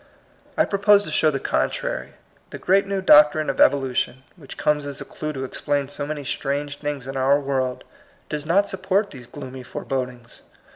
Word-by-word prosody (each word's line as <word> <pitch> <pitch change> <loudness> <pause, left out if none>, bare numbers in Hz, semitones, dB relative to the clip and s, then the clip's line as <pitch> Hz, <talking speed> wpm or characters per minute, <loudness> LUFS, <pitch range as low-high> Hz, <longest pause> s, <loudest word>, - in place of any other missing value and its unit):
I - - +4
propose 205 0 +4
to - - -6
show 155 - +3
the 140 -2 -2
contrary. - - -2 0.4
The - - -7
great 195 +1 +2
new 195 -1 -2
doctrine 150 -2 +6
of - - -2
evolution, 130 -1 +2
which 150 -6 -12
comes 150 -1 +1
as 140 -2 -4
a - - -7
clew 155 - -5
to 135 -2 -4
explain 140 +1 -2
so 145 0 -4
many 150 -1 -4
strange 145 +1 -3
things 145 -3 -4
in 135 0 -4
our 135 +2 +3
world, 130 -2 -2 0.4
does 150 -1 -4
not 190 +6 +2
support 190 +2 0
these 125 -4 -11
gloomy 130 -2 -8
forebodings. 125 -1 -5
145 Hz, 180 wpm, -23 LUFS, 135-160 Hz, 0.4 s, doctrine